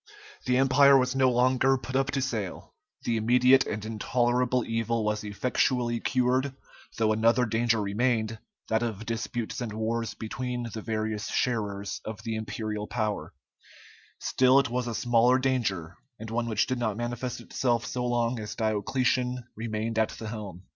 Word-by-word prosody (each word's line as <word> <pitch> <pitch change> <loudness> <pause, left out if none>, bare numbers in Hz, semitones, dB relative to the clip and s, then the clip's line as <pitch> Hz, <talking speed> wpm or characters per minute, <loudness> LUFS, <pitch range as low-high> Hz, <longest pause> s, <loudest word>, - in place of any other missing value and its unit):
The 125 0 +3
Empire 135 +1 +6
was 130 0 +1
no 130 -1 +4
longer 130 +2 +3
put 130 +1 -7
up 135 +1 +2
to 140 -2 0
sale, 110 -8 -4 0.3
the 115 -1 0
immediate 125 +4 +5
and 105 0 -4
intolerable 120 +3 +1
evil 115 0 -1
was 105 0 -1
effectually 120 +2 0
cured, 130 +2 +1 0.4
though 110 -1 +3
another 115 +3 +3
danger 115 0 +1
remained, 110 +2 0 0.3
that 110 0 +1
of 115 -2 -3
disputes 115 +2 -3
and 120 -3 -3
wars 115 +1 -2
between 120 +1 -4
the 110 - -5
various 110 -1 -2
sharers 100 -5 -2
of 110 -2 -7
the 115 - -3
imperial 110 -1 -4
power; 105 -10 -3 0.8
still 130 +1 +3
it 140 -4 +3
was 125 0 -1
a 115 - -3
smaller 120 +2 +4
danger 110 -11 -1 0.2
and 110 +1 -8
one 115 +1 -1
which 110 -2 +2
did 130 -1 -2
not 110 -4 -1
manifest 120 +1 -3
itself 120 -2 -1
so 125 - -3
long 120 -1 0
as 105 0 -6
Diocletian 125 +3 0
remained 110 0 -2
at 110 - +2
the 110 - -7
helm. 100 -5 -7
115 Hz, 160 wpm, -28 LUFS, 110-125 Hz, 0.8 s, Empire